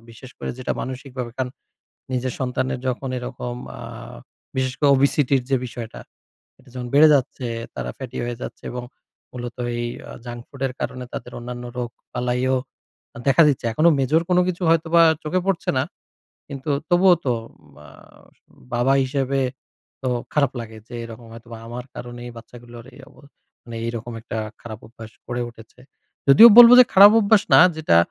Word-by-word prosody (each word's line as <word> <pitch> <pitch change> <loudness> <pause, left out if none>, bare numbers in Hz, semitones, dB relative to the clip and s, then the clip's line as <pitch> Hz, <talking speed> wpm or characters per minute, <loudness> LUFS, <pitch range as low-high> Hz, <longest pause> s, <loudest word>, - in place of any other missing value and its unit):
বিশেষ 125 +3 -13
করে - - -4
যেটা 130 - -2
মানসিকভাবে 130 -1 -6
কান 130 -1 -1 0.7
নিজের 130 0 -2
সন্তানের 130 0 -2
যখন 130 +1 -3
এরকম 125 0 -6 0.2
আ - - -11 0.8
বিশেষ 130 -1 -1
করে 145 - +4
ওবেসিটি 140 0 +2
র - - -10
যে 135 - +3
বিষয়টা। 115 -2 -8 0.6
এটা 130 - -22
যখন 125 -1 -5
বেড়ে 155 +2 +8
যাচ্ছে, 130 -2 -1 0.3
তারা - - -4
ফ্যাটি 130 -3 -8
হয়ে 120 0 -4
যাচ্ছে - - -8
এবং 125 0 -5 0.5
মূলত 120 -1 -7 0.2
এই 120 - -2 0.2
আ - - -8
জাঙ্ক 120 0 -7
ফুডের 135 -2 -4
কারণে 125 0 -4
তাদের - - -7
অন্যান্য 120 0 -7
রোগ 120 -1 -3 0.2
বালাইও 125 +1 0 0.7
দেখা 135 +5 +6
দিচ্ছে। 140 - -1
এখনো 155 +8 +4
মেজর 140 +5 +2
কোন 180 - +4
কিছু 180 0 -4
হয়তোবা 165 +1 +4 0.2
চোখে 170 +4 -1
পড়ছে 195 -4 0
না। 130 - +1 0.6
কিন্তু 140 +1 -6 0.2
তবুও 180 +1 +5
তো 125 - +2 0.4
মা-বাবা 95 - -5
হিসেবে 135 0 -1 0.6
তো 130 - -1 0.2
খারাপ 140 -4 +2
লাগে। 110 -1 -9
যে 120 - -10
এরকম 115 0 -11
হয়তোবা 115 0 -11
আমার 120 +1 -7
কারণেই 120 0 -8
বাচ্চাগুলোর 120 0 -12
এই 130 - -15
অব - - -23 0.5
মানে 115 -1 -8
এইরকম 115 0 -5
একটা 115 0 -6 0.2
খারাপ 110 -2 -9
অভ্যাস 115 0 -12
করে 120 0 -3
উঠেছে। 115 +1 -17 0.5
যদিও 180 +13 +10
বলব 240 -1 +12
যে - - +9
খারাপ 200 +2 +9
অভ্যাস 210 0 +4
না - - +9 0.2
যেটা 155 - +2
125 Hz, 160 wpm, -22 LUFS, 120-140 Hz, 0.8 s, বলব